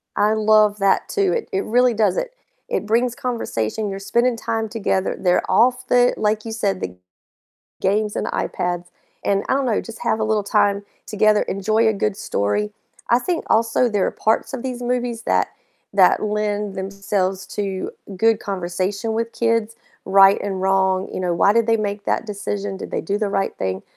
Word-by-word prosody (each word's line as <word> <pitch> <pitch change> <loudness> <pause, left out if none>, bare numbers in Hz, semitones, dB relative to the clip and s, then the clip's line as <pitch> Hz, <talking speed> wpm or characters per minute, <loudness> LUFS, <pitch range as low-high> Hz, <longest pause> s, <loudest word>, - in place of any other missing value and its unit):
I 210 +1 +3
love 215 -1 +3
that 195 0 +2
too. 400 -4 +1
It 475 0 -3
it 390 -1 0
really 245 +2 +3
does 220 - +1
it. - - -3 0.3
It - - -2
brings 235 +3 +1
conversation, 220 - -2
you're 195 0 -5
spending 235 +4 +1
time 225 -1 -2
together, 200 -4 -1
they're 180 -1 +1
off 245 +6 +3
the 245 0 +4
like 215 +1 0
you 225 - -5
said, 200 -4 -1
the 90 0 -5 0.9
games 210 +2 +1
and - - -2
iPads, 175 0 -2 0.4
and 200 0 +1
I - - +3
don't 275 0 +1
know, 230 -4 +1
just 230 0 -10
have 220 -2 +1
a - - 0
little 215 -1 +1
time 205 0 +2 0.2
together, 215 0 +3
enjoy 215 +4 +1
a 220 - +3
good 205 0 -1
story. 155 - -1 0.4
I 240 +1 +5
think 345 +6 -2
also 230 +2 +3
there 205 -4 +1
are - - -1
parts 220 +5 0
of 260 -2 -4
these 250 -2 -4
movies 245 -1 -2
that - - +1 0.4
that 190 -2 +5
lend 210 -1 -2
themselves 195 0 -2
to 195 -2 -3 0.3
good 225 +2 +3
conversation 195 +3 -3
with 230 +1 -2
kids, 230 -1 0 0.3
right 195 +1 +6
and 190 -2 -3
wrong, 190 0 +1
you - - -3
know, 180 -2 0
why 195 +4 +4
did 230 0 +3
they 225 0 +3
make 205 -1 -3
that - - 0
decision? 205 -1 -4
Did - - -8
they - - -1
do 200 +5 -1
the 210 -1 -1
right 195 -1 -1
thing? 95 0 -3
210 Hz, 190 wpm, -21 LUFS, 195-230 Hz, 0.9 s, right